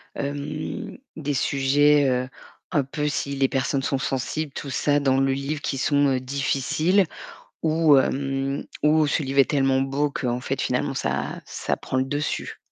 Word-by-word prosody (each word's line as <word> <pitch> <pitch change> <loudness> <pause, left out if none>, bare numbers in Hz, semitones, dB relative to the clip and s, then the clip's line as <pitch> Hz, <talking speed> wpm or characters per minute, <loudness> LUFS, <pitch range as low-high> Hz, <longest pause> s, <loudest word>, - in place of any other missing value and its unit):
hem, 145 - -4 0.2
des 145 -2 -2
sujets, 140 +1 +3
heu, 125 0 0 0.4
un 145 -4 +2
peu 150 +3 -3
si 140 -1 -2
les 135 -1 +2
personnes 135 +1 -1
sont 135 0 0
sensibles, 135 +3 -2
tout 140 - -6
ça, 145 +3 +2
dans 135 -2 +2
le 135 0 +2
livre, 140 +2 -3
qui 135 - -2
sont, 145 +1 +2
heu, 130 - 0
difficiles 140 +8 +1 0.6
ou, 155 -2 +5
hem, 135 +1 0 0.2
ou 155 0 +4
ce 150 - 0
livre 135 +1 0
est 135 - +5
tellement 135 -2 +2
beau 140 +2 0
qu'en 125 -3 -2
fait, - - -2
finalement, - - 0
ça - - -2
ça - - -2
prend 130 - -4
le 130 - +3
dessus? 145 +2 -3
140 Hz, 170 wpm, -24 LUFS, 135-145 Hz, 0.6 s, ou